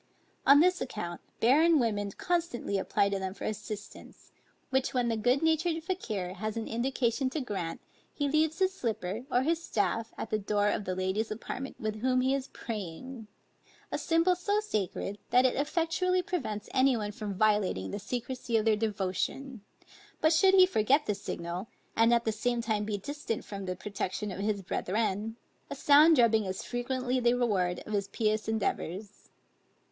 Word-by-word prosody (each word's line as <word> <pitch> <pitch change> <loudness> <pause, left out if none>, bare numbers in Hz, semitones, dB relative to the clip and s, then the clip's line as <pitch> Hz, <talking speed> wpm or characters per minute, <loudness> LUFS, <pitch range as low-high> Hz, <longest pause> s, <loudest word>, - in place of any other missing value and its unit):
On 285 +2 +8
this 365 +1 +3
account, 175 -8 -5 0.2
barren 310 +8 +5
women 210 -5 0
constantly 335 - -1
apply 200 +1 +1
to 200 -1 -1
them 190 0 -4
for - - -9
assistance; 210 0 -7 0.4
which 265 0 0
when 245 -1 +2
the 230 - +1
good 245 +6 +2
natured 320 +1 +2
Fakier 215 - -3
has 215 +3 -3
an 225 - -3
indication 250 +2 0
to 310 - -3
grant, 195 - -4 0.3
he 285 - -1
leaves 310 +2 +2
his 380 0 +2
slipper, 225 - -3
or 245 - +3
his 330 +3 0
staff 225 -1 -1
at 225 - -5
the 215 - +1
door 205 0 +1
of 205 - -1
the 185 - -2
lady's 190 +4 -1
apartment 250 +5 -6
with 215 -1 -3
whom 255 0 +2
he 260 +1 +2
is 275 -1 -2
praying; 220 +3 -7 0.6
a - - -1
symbol 335 +2 +3
so 405 +4 0
sacred, 205 - -3
that 250 +1 +5
it 255 - +3
effectually 335 +5 +1
prevents 265 - -3
any 260 -1 +4
one 210 -1 -3
from 210 -1 -5
violating 200 - +1
the 205 - -4
secrecy 245 +2 -2
of 215 - 0
their 220 -1 +4
devotion; 215 +4 -2 0.6
but 315 +1 +4
should 380 +4 +5
he 370 -1 +9
forget 280 - +2
this 205 -2 -2
signal, 170 +4 -4 0.3
and 225 +1 +4
at 235 0 +3
the 220 - +2
same 240 +2 -1
time 220 -3 -1
be 210 -1 -2
distant 255 +1 -4
from 200 -1 -6
the 180 - -2
protection 200 +1 -4
of 190 - -6
his 205 -1 -1
brethren, 215 +3 -1 0.3
a - - -4
sound 300 +3 +6
drubbing 225 -4 +4
is 190 0 -4
frequently 255 +1 -1
the 240 0 +3
reward 190 -8 0
of 215 - -6
his 200 -1 0
pious 215 0 0
endeavors. 205 -2 -3
225 Hz, 175 wpm, -30 LUFS, 205-270 Hz, 0.6 s, he